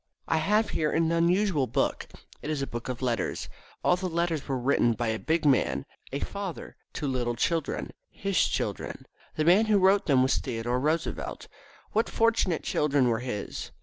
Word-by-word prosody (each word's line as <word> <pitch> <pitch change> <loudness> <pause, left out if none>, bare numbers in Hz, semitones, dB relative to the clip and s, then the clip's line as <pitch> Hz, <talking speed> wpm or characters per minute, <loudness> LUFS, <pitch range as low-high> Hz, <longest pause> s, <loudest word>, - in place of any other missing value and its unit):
I - - +2
have 210 +7 +2
here 155 -1 0
an 165 0 +2
unusual 170 -3 +2
book. - - -1 0.3
It 150 - -5
is 150 -3 -1
a - - 0
book 120 -1 -6
of 125 0 -4
letters. 115 -6 -1 0.4
All 180 - +4
the 185 0 -3
letters 170 -3 -1
were 135 -2 -1
written 125 -2 +2
by 115 0 -2
a 110 0 -1
big 160 0 0
man, 130 - +2 0.3
a 140 - -2
father, 200 -4 -5 0.2
to 150 - -4
little 120 -3 -1
children, 165 +6 -1 0.2
his 195 -1 -4
children. - - -3 0.3
The 155 - 0
man 190 +6 +6
who 210 -1 +4
wrote 195 +1 +4
them 135 -4 +5
was 130 - +2
Theodore 120 0 -2
Roosevelt. 155 +4 -2 0.4
What 220 +2 +1
fortunate 225 -7 +1
children 140 -4 +2
were 115 -1 +1
his! 125 -5 -5
155 Hz, 180 wpm, -28 LUFS, 125-180 Hz, 0.4 s, man